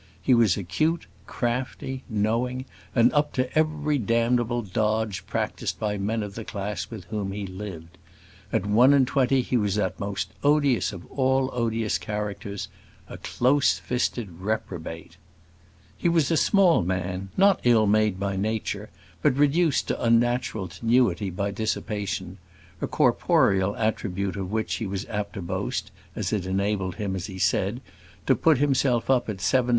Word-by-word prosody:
He 130 - +2
was 115 -7 +4
acute, 155 - 0 0.2
crafty, 125 +2 -3
knowing, 115 +4 0 0.3
and 120 0 +5
up 150 0 +1
to 130 0 -2
every 155 -2 +1
damnable 120 +1 +1
dodge 110 +1 -1
practised - - -2
by 105 -1 -2
men 110 +3 -1
of 100 -1 -6
the 115 - -6
class 100 -3 -4
with 110 -6 -8
whom 100 -3 -2
he 100 0 -4
lived. 90 -3 -8 0.5
At 90 - 0
one 120 +7 +5
and 135 -2 +5
twenty 130 0 +2
he 125 - 0
was 105 -3 0
that 100 -3 -1
most 100 -2 -3
odious 145 -6 +3
of 90 -4 -9
all 130 0 +1
odious 115 -3 0
characters 100 -1 -4 0.4
a - - -9
close 140 +3 +2
fisted 120 -7 -2
reprobate. 90 -5 -4 0.8
He 170 - 0
was 165 -4 +2
a - - +3
small 185 +1 +4
man, 90 +1 -2
not 195 0 +5
ill 115 -3 +5
made 105 -2 +2
by 100 0 -1
Nature, 110 +2 -2 0.3
but 125 - +2
reduced 145 +2 +3
to - - -2
unnatural 115 -3 +2
tenuity 105 0 +1
by 100 +3 -2
dissipation 105 -2 -3 0.4
a - - -1
corporeal 95 +1 +2
attribute 100 -3 -1
of 95 -1 -4
which 110 0 -1
he 110 - -3
was 95 0 -4
apt 105 -2 -3
to 95 - -6
boast, 85 - -3 0.2
as - - -2
it 95 -4 -1
enabled 95 -1 -1
him, 100 -3 -3
as 90 -1 -4
he 95 -2 -8
said, 100 +5 +1 0.4
to - - +4
put 160 -4 +4
himself 135 -3 +2
up 125 -3 +2
at 100 -3 -4
7 - - -3
st. 125 -1 +2
110 Hz, 160 wpm, -25 LUFS, 100-125 Hz, 0.8 s, and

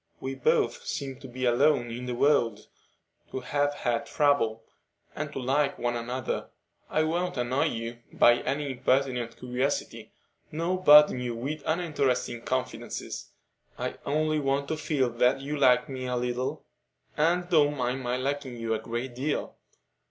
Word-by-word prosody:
We 135 - -4
both 135 -1 +1
seem 135 -2 -4
to 135 - -10
be 130 +1 -4
alone 120 0 +3
in 125 +2 -6
the 125 - -2
world, 120 -6 +2 0.6
to 130 - -4
have 145 +2 0
had 120 -4 -1
trouble, 115 -7 +2 0.5
and 150 -1 -4
to - - -7
like 140 +3 +1
one 120 0 -1
another. 120 +1 -3 0.4
I 155 - +2
won't 175 +1 -1
annoy 125 +5 +1
you 115 -4 -3
by 120 0 +5
any 140 0 -2
impertinent 125 -2 0
curiosity, 125 +3 -2 0.4
nor 175 +4 -1
burden 150 -4 +8
you 120 -1 -3
with 140 +6 -4
uninteresting 140 -8 0
confidences; 130 +1 -4 0.5
I - - -4
only 155 +1 +1
want 140 0 0
to 160 - 0
feel 150 -4 0
that 125 +3 +2
you 145 +2 -3
like 130 -1 +4
me 130 -2 -5
a 125 - -1
little 125 +1 -2 0.5
and 175 +3 +2
don't 150 -4 +3
mind 125 +1 -1
my 125 0 -1
liking 135 -1 -3
you 115 -1 -1
a 110 - -1
great 120 +2 -4
deal. 140 +5 -2
130 Hz, 155 wpm, -28 LUFS, 120-145 Hz, 0.6 s, burden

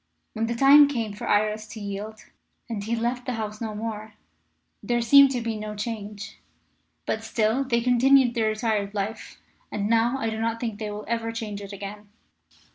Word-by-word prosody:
When 225 0 -1
the 235 - -2
time 280 +4 +8
came 230 -7 -3
for 205 - -7
Iris 215 +1 +1
to 220 - -9
yield, 205 +2 -6 0.5
and 220 -4 -4
he 225 +3 -1
left 240 +2 -2
the 255 - -1
house 215 -1 -5
no 220 -2 -4
more, 215 -1 -6 0.7
there 240 0 0
seemed 275 +4 +7
to 250 -2 -2
be 230 -1 -2
no 210 0 -5
change. 210 -2 -6 0.7
But 220 - -2
still 225 +3 +1
they 235 -3 0
continued 250 +1 +4
their 225 -2 +1
retired 215 -2 -1
life, 205 +2 -4 0.3
and 205 -1 -2
now 230 +3 +2
I 225 -4 -2
do 220 0 -4
not 230 0 -1
think 225 -3 -4
they 215 -1 -4
will 210 0 -6
ever 230 0 -2
change 215 -3 -5
it 200 0 -8
again. 205 +1 -8
220 Hz, 190 wpm, -25 LUFS, 210-235 Hz, 0.7 s, time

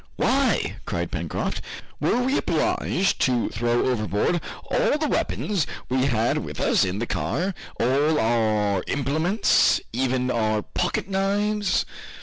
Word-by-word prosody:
"Why," 270 0 +1
cried - - -2
Pencroft, - - -3 0.4
"were 250 - +1
we 265 +2 +1
obliged 195 -8 0
to 125 -3 +2
throw 120 +2 0
overboard 115 - 0 0.3
all - - +2
the 305 0 -1
weapons 200 - -1 0.2
we 130 +1 +1
had 115 -2 +1
with - - -7
us - - +3
in 95 +1 -1
the 115 - -2
car, 115 - -1 0.3
all 145 +5 +2
our 110 -4 +1
implements, 155 - +2
even 125 0 0
our 110 -3 0
pocket - - -2
knives?" 200 +1 0
130 Hz, 130 wpm, -24 LUFS, -, 0.4 s, us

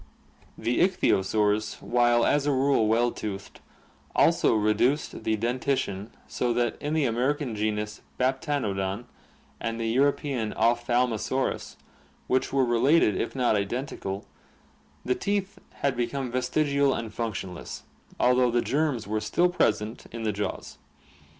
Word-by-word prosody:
The 115 +2 0
ichthyosaurs, 105 - +2
while 120 -1 +3
as 145 0 +2
a - - +3
rule 135 -4 +3
well 120 +2 +3
toothed, 100 -2 -6 0.6
also - - +4
reduced 110 +7 +1
the 110 - +2
dentition 115 -3 -1 0.2
so 120 -1 -1
that 120 -1 0
in 150 +1 -2
the 155 -3 +2
American 125 +1 0
genus 105 0 -2 0.2
Baptanodon 125 -7 -1 0.5
and 115 -1 -3
the 115 - -2
Euro 135 +5 +4
pean 130 -8 -3
Opkthaltnosaurus, 120 +2 0 0.5
which 130 - 0
were 135 -1 +3
related 120 - +3
if - - -3
not 125 -4 +2
identical, 100 -2 -3 0.8
the 125 - +2
teeth 200 +4 -2 0.2
had 140 -2 +2
be 120 -1 0
come 135 -3 -4
vestigial 140 +2 +1
and 115 -2 -5
function 105 -6 -3
less, 85 - -8 0.4
although 125 0 +4
the 120 0 +1
germs 145 -5 0
were 105 +1 -2
still 175 +12 +2
present 110 -9 0
in 115 0 -6
the 110 -1 0
jaws. 100 -1 -5
120 Hz, 135 wpm, -27 LUFS, 110-135 Hz, 0.8 s, also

